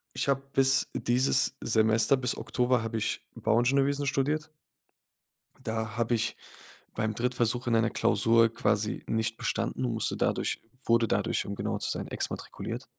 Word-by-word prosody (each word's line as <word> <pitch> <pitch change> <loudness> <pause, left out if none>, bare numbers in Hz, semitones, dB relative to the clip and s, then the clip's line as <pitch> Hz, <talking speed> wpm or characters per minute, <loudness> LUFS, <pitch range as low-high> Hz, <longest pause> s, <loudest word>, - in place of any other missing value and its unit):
Ich - - -1
habe 135 -1 +2
bis 135 0 +3
dieses 130 +2 +1
Semester, 110 +4 +3
bis 125 -1 0
Oktober, 125 -1 0
habe 115 0 -3
ich 110 - -2
Bauingenieurwesen 135 +5 +2
studiert 150 +3 -1 1.1
und - - -19
da 110 -1 -3
habe 120 0 +1
ich 115 - -1 0.6
beim 110 -1 -1
Drittversuch 120 0 -1
in 115 - +3
einer 115 0 +3
Klausur 115 0 +3
quasi 105 -1 0
nicht 110 0 -1
bestanden 130 - -2
und 120 - -1
musste 110 - -1
dadurch - - 0 0.2
wurde 115 0 +3
dadurch, - - 0
um 100 - -4
genauer - - -2
zu - - -2
sein, - - -4
exmatrikuliert. - - -5
115 Hz, 150 wpm, -29 LUFS, 110-130 Hz, 1.1 s, bis